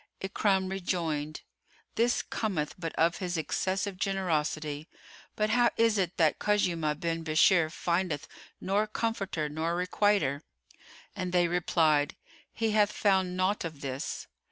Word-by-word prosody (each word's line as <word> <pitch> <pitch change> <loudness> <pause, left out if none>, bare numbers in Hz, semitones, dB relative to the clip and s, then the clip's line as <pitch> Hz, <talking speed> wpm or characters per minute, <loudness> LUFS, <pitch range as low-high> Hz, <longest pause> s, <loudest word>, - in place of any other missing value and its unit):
Ikrimah 190 0 +1
rejoined, 160 -5 -2 0.5
"This 235 +2 +2
cometh 180 -9 -2
but 165 -2 -3
of 165 +1 +2
his 180 -3 -3
excessive 185 +5 -1
generosity: 155 -6 -1 0.5
but 215 0 +1
how 240 -1 +4
is 225 -2 +3
it 180 -2 -1
that 160 -3 +3
Khuzaymah 170 -7 +1
bin 165 -1 -2
Bishr 160 +1 +4
findeth 170 -4 -1 0.3
nor 200 +3 +1
comforter 200 -8 -2
nor 160 +3 -2
requiter?" 180 -5 +1 0.7
And 185 -1 -3
they 175 -1 +3
replied, 160 -4 +2 0.4
"He 225 -1 -1
hath 210 -1 +3
found 190 -3 +1
naught 185 +3 +1
of 160 -4 -6
this." 135 +2 -4
180 Hz, 130 wpm, -29 LUFS, 155-195 Hz, 0.7 s, how